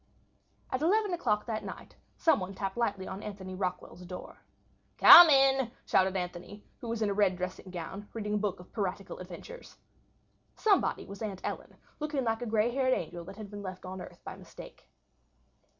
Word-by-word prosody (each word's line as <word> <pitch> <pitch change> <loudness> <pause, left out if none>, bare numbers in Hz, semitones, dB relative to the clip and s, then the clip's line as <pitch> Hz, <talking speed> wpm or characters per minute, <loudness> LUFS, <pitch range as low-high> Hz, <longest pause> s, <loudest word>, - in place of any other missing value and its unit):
At 260 - -1
11 405 +4 +2
o'clock 220 -12 0
that 220 -2 -3
night - - -9 0.2
somebody 195 - +1
tapped 195 -1 -3
lightly 200 -5 -1
on 190 +2 -6
Anthony 195 -3 -7
Rockwall's 180 -1 -4
door. 180 0 -9 0.6
"Come 345 -1 +11
in," 270 -3 +4 0.2
shouted 190 0 +2
Anthony, 180 +3 -6 0.2
who 235 - -7
was 225 -1 -1
in 205 - +1
a - - 0
red 195 -2 +2
dressing 185 +1 -5
gown, 185 +3 -7
reading 210 -2 -4
a - - +2
book 205 -3 -2
of 180 - -15
piratical 195 -2 -4
adventures. 185 - -10 0.8
Somebody 410 -4 +2
was 200 +1 -10
Aunt 200 -4 -4
Ellen, - - -5 0.2
looking 295 -3 -2
like 225 0 -1
a 245 - -3
grey 220 +2 +2
haired 260 0 +2
angel 170 +1 -5
that 195 +2 -10
had 215 -2 -9
been 205 0 -7
left 185 -1 -7
on 185 0 -6
earth - - -12
by - - -7
mistake. - - -13
205 Hz, 180 wpm, -30 LUFS, 185-240 Hz, 0.8 s, Come